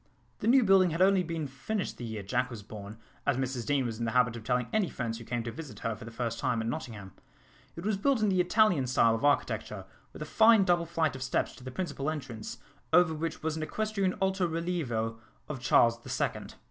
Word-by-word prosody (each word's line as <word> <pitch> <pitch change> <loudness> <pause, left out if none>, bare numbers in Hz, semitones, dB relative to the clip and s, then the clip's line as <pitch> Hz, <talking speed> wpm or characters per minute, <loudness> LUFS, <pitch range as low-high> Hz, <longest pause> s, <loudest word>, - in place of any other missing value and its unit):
The 210 - -2
new 255 +2 +6
building 190 -3 +5
had 165 +2 -2
only 195 0 +5
been 165 -3 -3
finished 140 +10 -4
the - - -7
year 110 -3 -5
Jack 125 +5 0
was 115 -4 -8
born, 105 0 -9 0.3
as 140 -3 +2
Mrs 130 -3 -3
Deane 140 -3 +2
was 115 -2 -4
in 115 - -1
the 110 - -2
habit 125 -2 +3
of 115 - -8
telling 125 +1 0
any 215 -4 +2
friends 115 -2 -4
who - - -9
came 120 0 -3
to 115 - -4
visit 140 -6 -9
her 115 -1 -1
for 110 - -11
the - - -7
first 115 -1 -3
time 120 -1 0
at 110 - -2
Nottingham. 105 -5 -5 0.6
It 170 - -7
was 210 -2 +1
built 265 +5 +2
in 210 - +3
the 185 -2 +3
Italian 180 - +3
style 115 -2 +4
of 115 +4 -3
architecture, 110 -8 0 0.3
with - - -7
a - - -6
fine 220 +4 +6
double 175 -2 +2
flight 160 -4 0
of 130 - -8
steps 125 - -1
to - - -13
the 130 - -6
principal 145 -1 -3
entrance, 125 -7 -6 0.3
over 170 0 +5
which 160 0 -4
was 160 0 -1
an 160 - -4
equestrian 200 +2 -1
alto 190 -1 +1
relievo 155 -10 -2 0.3
of 145 -4 -5
Charles 115 -2 +4
the - - -11
Second. - - -2
135 Hz, 235 wpm, -30 LUFS, 115-180 Hz, 0.6 s, new